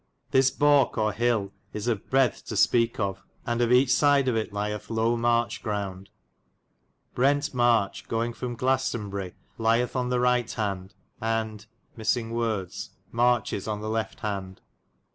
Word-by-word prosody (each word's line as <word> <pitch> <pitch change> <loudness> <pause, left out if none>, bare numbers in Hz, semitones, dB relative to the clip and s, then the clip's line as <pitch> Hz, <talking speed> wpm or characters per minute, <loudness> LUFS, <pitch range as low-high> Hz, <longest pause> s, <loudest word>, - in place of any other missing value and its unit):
This 130 0 +5
balke 145 -1 +3
or 110 -1 +1
hille 115 -4 0 0.2
is 105 +2 -4
of 110 -5 -2
breadthe 135 -1 +2
to 110 - -3
speke 115 +3 +3
of, 100 -2 -2 0.2
and 120 0 -1
of 120 0 +2
eche 125 +1 +5
syde 145 -1 +4
of 125 - +2
it 110 -1 -1
lyethe 105 +1 -4
low 115 +1 +1
marche 120 0 +1
ground. 100 -3 -4 1.0
Brent 145 +3 +2
Merche 120 -5 +2
goynge 115 +1 -1
from 120 0 -5
Glassenbyri 115 -8 -1 0.3
lyethe 115 +3 +2
on 125 -1 0
the 125 0 +1
right 125 -1 +2
hand, 95 -3 -3 0.3
and... 110 -1 -2 0.3
marchis 115 0 -1
on 105 -1 -3
the 110 - -4
left 110 0 -3
hand. 95 -3 -4
115 Hz, 145 wpm, -26 LUFS, 105-125 Hz, 1.0 s, This